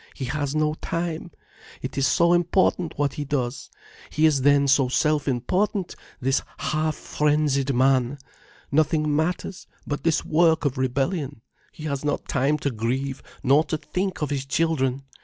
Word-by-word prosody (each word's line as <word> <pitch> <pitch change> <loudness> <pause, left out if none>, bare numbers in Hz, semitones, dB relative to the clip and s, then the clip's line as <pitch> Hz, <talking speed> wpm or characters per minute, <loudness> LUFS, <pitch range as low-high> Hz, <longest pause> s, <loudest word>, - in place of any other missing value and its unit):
"He 135 - -4
has 145 +2 -2
no 155 0 +2
time. 170 0 -3 0.5
It - - -5
is 135 -1 +2
so 170 +6 +4
important, 175 0 +1
what 145 -1 0
he 150 - -4
does! 135 -3 -3 0.4
He 155 - +2
is 150 -4 +3
then 140 +1 +4
so 135 -1 +4
self 150 +2 +1
important, 180 - 0 0.2
this 135 +2 +1 0.2
half 155 0 -1
frenzied 145 -3 0
man! 130 +1 +2 0.5
Nothing 155 0 +2
matters, 175 +4 -2 0.2
but 145 - -3
this 165 -1 +1
work 160 0 +3
of 130 -2 -1
rebellion! 135 +1 -1 0.3
He 155 - -11
has 140 -3 -3
not 145 - -2
time 140 +2 +1
to 140 - +2
grieve, 130 +4 -2 0.2
nor 140 +4 +5
to 155 - -2
think 180 +3 -3
of 145 - -2
his 135 -1 -2
children! 135 -4 0
145 Hz, 160 wpm, -24 LUFS, 135-160 Hz, 0.5 s, nor